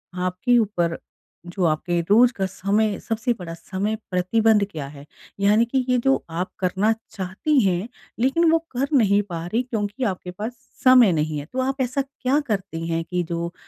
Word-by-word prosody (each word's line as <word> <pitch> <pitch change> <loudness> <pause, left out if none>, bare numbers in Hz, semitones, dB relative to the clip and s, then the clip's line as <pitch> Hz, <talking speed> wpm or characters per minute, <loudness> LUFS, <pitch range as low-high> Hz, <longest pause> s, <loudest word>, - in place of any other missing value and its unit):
आपके 185 +7 +1
ऊपर, 175 -7 0 0.5
जो 175 +2 -3
आपके 170 +2 0
रोज़ 240 +4 +6
का 195 -4 -1
समय 200 +2 0
सबसे 230 +2 -1
बड़ा 170 -2 -6
समय 195 +5 -3 0.2
प्रतिबंध 210 +3 +3
क्या 145 -4 -5
है? 140 0 -12 0.3
यानी 210 +3 +4
कि 255 +1 -1
ये 250 - +3
जो 270 - +5
आप 175 +3 -3
करना 190 +4 +1 0.2
चाहती 200 +10 0
हैं, 185 +3 0 0.3
लेकिन 320 +7 +3
वो 330 - +4
कर 265 +3 -1
नहीं 205 -3 +4
पा 165 -1 -4
रही 220 +8 0
क्योंकि 225 0 -3
आपके 185 -4 -2
पास, 210 +6 -5 0.3
समय 255 -6 +7
नहीं 155 -1 -1
है। 145 - -7
तो 260 - -2
आप 265 +1 -1
ऐसा 260 +2 0
क्या 270 0 -1
करती 190 -6 -3
हैं 165 0 -1
कि 180 +1 -2
जो, 170 +1 -4
200 Hz, 180 wpm, -23 LUFS, 175-245 Hz, 0.5 s, समय